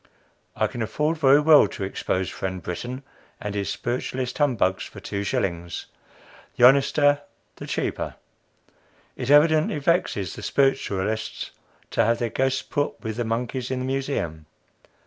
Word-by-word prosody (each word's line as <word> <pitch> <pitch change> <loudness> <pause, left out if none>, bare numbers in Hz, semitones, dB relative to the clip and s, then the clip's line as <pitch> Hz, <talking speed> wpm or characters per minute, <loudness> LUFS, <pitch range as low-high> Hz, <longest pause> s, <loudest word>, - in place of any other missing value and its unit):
I - - +1
can 120 - -4
afford 150 +8 -1
very 140 -1 +6
well 150 0 +7
to 100 - -6
expose 95 -1 -2
friend 95 -2 -4
Brittan 120 +10 -5 0.4
and 105 - -4
his 100 -1 -2
spiritualist 125 +3 -3
humbugs 115 -10 +2
for - - -10
two 100 0 -4
shillings. 85 -3 -2 0.7
The 120 - +9
honester 145 +2 +4 0.4
the - - -8
cheaper. - - -2 1.0
It 125 0 -5
evidently 155 +1 +5
vexes 140 - 0
the - - -8
spiritualists 110 -6 0 0.4
to - - +3
have 115 +1 +2
their 120 -2 -2
ghosts 135 0 0
put 145 0 -2
with 110 -2 -3
the 120 - -1
monkeys 120 +2 -2
in 130 - -1
the - - -2
Museum. 130 - -3
125 Hz, 145 wpm, -24 LUFS, 100-140 Hz, 1.0 s, The